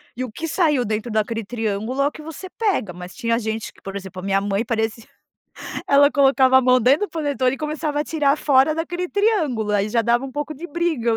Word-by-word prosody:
e 255 - -3
o 245 - -6
que 330 +8 -5
saiu 300 -7 +2
dentro 215 +2 -3
daquele 220 +1 -1
triângulo 225 +3 -2
é 280 - +3
o - - -2
que 310 - -11
você 320 +4 -8
pega. 385 - -1
Mas 180 +1 -10
tinha 230 -1 0
gente 220 0 -4
que, - - -23
por 195 0 -7
exemplo, 190 -2 -7
a - - -8
minha 195 0 +1
mãe 200 +2 -1
parecia 225 -1 -2 0.8
ela 285 +1 +6
colocava 270 -2 +5
a - - +4
mão 255 0 +4
dentro 280 - +3
do - - -26
panetone 285 -5 0
e - - -10
começava 300 -1 -2
a 300 - -1
tirar 295 -2 +1
fora 280 +1 +3
daquele 350 +2 -3
triângulo. 315 - +1
Aí 205 0 +1
já 230 +1 +1
dava 240 +3 +2
um 265 - -7
pouco 295 +1 -4
de 335 +6 -8
briga 305 -8 0
260 Hz, 230 wpm, -21 LUFS, 220-300 Hz, 0.8 s, ela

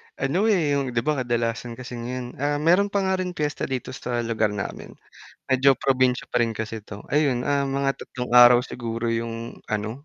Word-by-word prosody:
Ano 180 +11 0
eh, 175 -9 +2
yung, 135 -3 -1
di 115 - +2
ba, 150 0 0
kadalasan 120 -1 -2
kasi 125 +1 -9
ngayon, 125 +1 -6
ah, 145 +1 0
meron 180 +6 +4
pa 200 -1 -1
nga 190 0 0
rin 180 -1 -3
piyesta 150 -1 -2
dito 130 -2 -4
sa 120 -1 -3
lugar 110 -2 0
namin, 100 - -6 0.5
medyo 130 +1 +5
probinsya 130 -2 +1
pa 120 -1 +2
rin 115 - -2
kasi 110 -1 -5
ito 105 -1 -9
ayun, 140 -4 +2
ah, 140 -1 +1
mga 135 0 -1
3 125 -1 -6
araw 120 0 +9
siguro 115 -2 -4
yung 115 0 -3
ano, 110 +6 -4
125 Hz, 190 wpm, -24 LUFS, 115-140 Hz, 0.5 s, araw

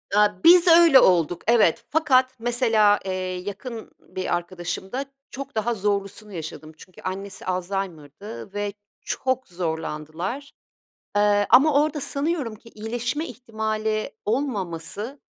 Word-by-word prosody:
Aaa, 210 -2 +3
biz 350 +1 +8
öyle 330 -5 +8
olduk, 175 -3 +3
evet. 230 -8 +3
Fakat 260 -4 +3
mesela, 225 -4 +3
iii, 185 0 -4
yakın 230 +3 -8
bir 185 - -3
arkadaşımda 185 +8 -4 0.3
çok 275 -3 -8
daha 225 +2 0
zorlusunu 205 0 -2
yaşadım. 155 -1 -7
Çünkü 185 - -15
annesi 190 +1 -6
Alzheimer'dı 185 +1 -5
ve 205 -1 -3 0.3
çok 260 -1 -2
zorlandılar, 170 - -4 0.6
eee, 205 0 +3
ama 285 +3 +6
orada 305 -1 -2
sanıyorum 280 -5 -2
ki 230 +2 -16
iyileşme 240 +8 -3
ihtimali 220 -2 -3
olmaması 210 - -3
210 Hz, 115 wpm, -24 LUFS, 185-255 Hz, 0.6 s, biz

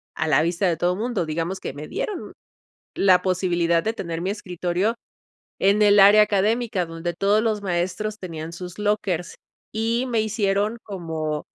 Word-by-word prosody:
a 160 - -1
la 155 0 +4
vista 175 +3 0
de 170 -2 0
todo 175 +2 +1
mundo. 220 -3 -2
Digamos 165 +4 -3
que - - -5
me 150 +2 -8
dieron 400 -5 -4 0.6
la 185 -2 +4
posibilidad 175 -2 +1
de 220 - 0
tener 170 -6 -5
mi 185 +3 -1
escritorio 185 +2 -2 0.6
en 200 +2 +4
el 205 -1 +6
área 205 +2 +8
académica, 210 0 +1
donde 165 +1 -5
todos 205 +2 +2
los 215 -2 0
maestros 190 +4 -2
tenían 165 -3 -7
sus 180 +1 -8
lockers 200 -5 -1 0.4
y 230 +3 0
me 230 -3 +1
hicieron 210 0 0
como, 160 -6 -4
190 Hz, 160 wpm, -23 LUFS, 170-210 Hz, 0.6 s, área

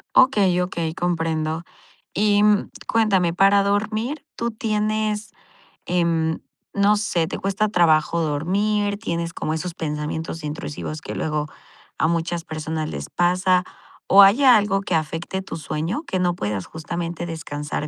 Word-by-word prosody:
Okey, 200 -9 +5
okey, 170 -3 -2
comprendo. 165 -2 -1 0.5
Y, 205 0 +3
mm, 210 -1 +3 0.2
cuéntame, 195 -7 +2
para 195 +2 +5
dormir, 215 +8 -1
¿tú 235 0 -2
tienes, 215 -1 -1 0.5
em, 165 -2 +1 0.3
no 200 +1 +4
sé, 180 -6 0
te - - -4
cuesta 195 +2 0
trabajo 170 -3 +3
dormir, 200 +7 0
tienes 170 -5 -3
como 155 - -2
esos 170 +2 -3
pensamientos 155 +1 -4
intrusivos 150 0 -5
que - - -6
luego 150 -1 -2 0.5
a - - +2
muchas 170 0 -1
personas 155 0 -4
les 70 0 -6
pasa 180 +1 +2 0.4
o 200 +1 +8
hay 215 +9 +5
algo 205 -6 +5
que 185 -3 -1
afecte 165 +4 -2
tu 190 - -7
sueño, 165 - -3
que 185 - -1
no 175 -1 +1
puedas 105 - -3
justamente 170 +1 -5
descansar 150 -2 -4
175 Hz, 140 wpm, -22 LUFS, 160-205 Hz, 0.5 s, o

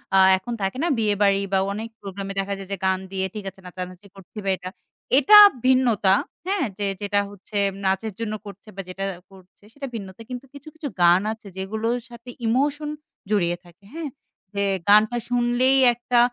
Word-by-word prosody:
আ - - +7 0.2
এখন 235 +6 -6
থাকে 195 +6 -1
না - - +2
বিয়েবাড়ি 205 -2 +2
বা 190 - +4
অনেক 220 +2 -5
প্রোগ্রাম 195 0 -6
এ - - -4
দেখা 195 +1 -2
যায় 195 -1 -9
যে 200 - -2
গান 190 0 +2
দিয়ে 190 -1 -1
ঠিক 210 - -6
আছে 190 - -20
নাচানাচি 180 +2 -8
করছি 195 +2 -16
বা - - +1
এটা। 180 0 -7 0.5
এটা 295 +10 +8 0.3
ভিন্নতা। 235 -7 +4 0.3
হ্যাঁ? 390 -5 0
যে 205 - -2 0.2
যেটা 205 0 +1
হচ্ছে 205 +1 -8 0.3
নাচের 195 +2 0
জন্য 225 -2 -3 0.4
বা 195 - -4
যেটা 190 +2 -5 0.3
করছে 190 0 -19
সেটা 280 0 -6
ভিন্নতা 195 -1 -8
কিন্তু 250 +1 -6
কিছু, 285 +2 -13
কিছু 315 -2 -5 0.2
গান 175 +2 +6
আছে 220 -2 -14
যেগুলোর 220 +5 -2
সাথে 235 +1 -12 0.2
emotion 290 +5 +1 0.4
জড়িয়ে 175 -5 +1
থাকে। 175 +3 -20
হ্যাঁ? 320 -3 -4 0.4
যে 200 0 0 0.3
গানটা 215 +3 +6
শুনলেই 245 +2 +3 0.2
একটা 240 +1 +1
210 Hz, 175 wpm, -23 LUFS, 190-245 Hz, 0.5 s, এটা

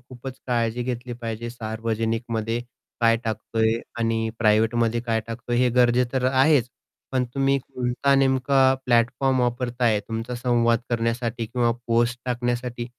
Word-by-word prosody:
खूपच 130 +1 -9
काळजी 120 -1 0
घेतली 125 0 -4
पाहिजे. 115 +1 -4
सार्वजनिकमध्ये 115 0 -2 0.4
काय 115 -1 +4
टाकतोय 110 0 0 0.3
आणि 115 -1 0
प्रायव्हेटमध्ये 115 +1 +2
काय 115 -2 -1
टाकतोय? 120 +1 -3
हे 125 0 +3
गरजेचं 125 +1 +2
आहेच. 135 -1 +4 0.4
पण 130 -1 +1
तुम्ही 135 0 +2
कोणता 130 +1 0
नेमका 135 0 +3 0.2
प्लॅटफॉर्म 125 +2 +2
वापरताय, 120 -2 +1
तुमचा 115 +2 -4
संवाद 120 -1 +2
करण्यासाठी 115 0 -1
किंवा 120 +1 +1 0.2
पोस्ट 120 +1 +1
टाकण्यासाठी, 120 -1 -2
120 Hz, 120 wpm, -24 LUFS, 115-125 Hz, 0.4 s, काय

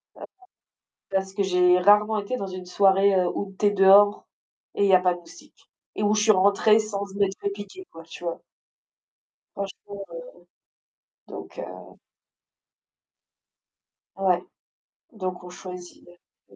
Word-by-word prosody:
D'accord, - - -10 0.8
parce 190 0 -2
que 205 - 0
j'ai 180 -1 +3
rarement 210 +3 +4
été 205 +5 -3
dans 195 - -5
une 185 -1 -8
soirée, 195 +1 +3
heu, 180 -1 +2
où 195 -1 -5
tu 210 - +1
es - - +5
dehors 205 +1 +5 0.5
et 200 - +1
il - - +3
y - - +7
a 185 - +6
pas 180 -1 +1
de - - -10
moustiques 175 - -18 0.3
et 210 - -3
où 210 +1 +2
je 210 - +1
suis 215 0 +5
rentrée 200 +3 +4
sans 205 -2 -4 0.2
être 195 -1 0
fait 200 - -2
piqué, 205 - -10
quoi, 165 - -12
tu 165 +1 -12
vois? 170 - -4 1.2
Franchement, 200 0 -7
heu, - - -10 1.1
donc - - -10
heu - - -10 2.2
Ouais, 185 -2 +1 0.7
donc 185 -4 -5
on 180 - -10
choisit 180 -1 -11 0.5
le - - -19
195 Hz, 150 wpm, -24 LUFS, 185-205 Hz, 2.2 s, y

